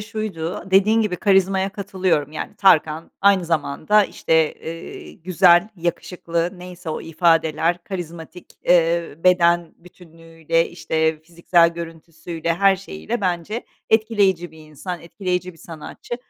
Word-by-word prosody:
şuydu, 210 -6 -5
dediğin 205 +4 +4
gibi, 185 -4 -2
karizmaya 195 0 +2
katılıyorum. 185 -7 -1
Yani, - - -6
Tarkan 160 -4 +3
aynı 195 -2 +4
zamanda, 165 +5 +1
işte, 160 -4 +1
eee, 165 +1 -9
güzel, 180 +2 +3
yakışıklı, 170 0 -3
neyse 180 -2 -8
o - - -4
ifadeler, 165 0 +1
karizmatik, 175 -2 -8 0.2
eee, 170 -2 +2
beden 175 -2 +3
bütünlüğüyle, 165 -1 -4
işte, 160 -2 -1
fiziksel 170 +1 +2
görüntüsüyle, 165 0 -5
her 195 +1 +4
şeyiyle 195 +4 -5
bence 185 +4 -2 0.3
etkileyici 205 -6 +2
bir 160 - -17
insan, 155 +4 -8
etkileyici 180 0 -3
bir 165 - -21
sanatçı 165 +9 -8
170 Hz, 120 wpm, -21 LUFS, 165-190 Hz, 0.3 s, dediğin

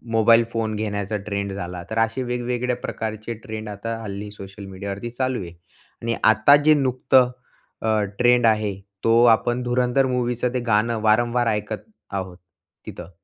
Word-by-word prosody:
mobile 115 +1 +6
phone 110 -2 -2
घेण्याचा 105 -1 -2
trend 100 -1 -2
झाला, 90 -2 -5
तर 110 - -4
असे 115 +3 0
वेगवेगळ्या 125 0 -2
प्रकारचे 110 +1 -4
ट्रेंड 110 -1 -6
आता 115 +3 -5
हल्ली 100 0 -6
सोशल 100 0 -10
मीडियावरती 100 +4 -6
चालू 130 -1 -2
आहे 85 - -7 0.5
आणि 115 0 -1
आता 110 +6 +6
जे 155 - +7
नुकतं 130 -2 +3 0.5
अ, 110 -1 +1 0.2
ट्रेंड 120 -1 +4
आहे, 105 -2 +2 0.3
तो 115 +1 +5
आपण 120 +2 0
धुरंधर 125 +2 +2
मूव्हीचं 125 -1 -1
ते 125 - 0
गाणं 110 +1 +2
वारंवार 120 +2 +2
ऐकत 105 0 -2 0.3
आहोत 95 -2 -4 0.5
तिथं 90 0 -9
115 Hz, 150 wpm, -23 LUFS, 105-120 Hz, 0.5 s, जे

